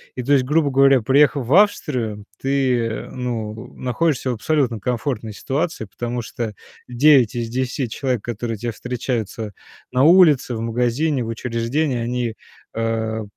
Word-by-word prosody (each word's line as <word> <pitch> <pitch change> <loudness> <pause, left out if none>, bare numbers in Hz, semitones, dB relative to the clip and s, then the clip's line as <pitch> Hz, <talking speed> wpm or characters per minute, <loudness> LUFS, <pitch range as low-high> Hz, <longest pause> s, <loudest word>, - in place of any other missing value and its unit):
И 125 - -4
то 140 - -2
есть 135 -2 +4
грубо 150 +2 +2
говоря, 135 -1 +5
приехав 140 +2 +3
в 130 - +1
Австрию, 125 - +2 0.2
ты, 135 -2 +1
э, 110 - -5
ну, 115 -3 -5
находишься 130 0 0
в - - -1
абсолютно 125 -1 0
комфортной 125 -1 -2
ситуации, 145 - -2
потому 120 +5 -4
что 115 -1 -5 0.4
9 130 -1 +5
из 120 -1 -2
10 130 +2 -2
человек, 125 -1 -2
которые 115 -1 -4
те 120 +3 -3
встречаются 115 -3 -4 0.4
на 130 +1 +3
улице, 155 -7 +5
в - - -4
магазине, 125 +5 0
в - - -6
учреждении, 120 +4 -1
они, 120 -1 -2 0.4
э, 110 -1 -2
125 Hz, 150 wpm, -21 LUFS, 115-140 Hz, 0.4 s, говоря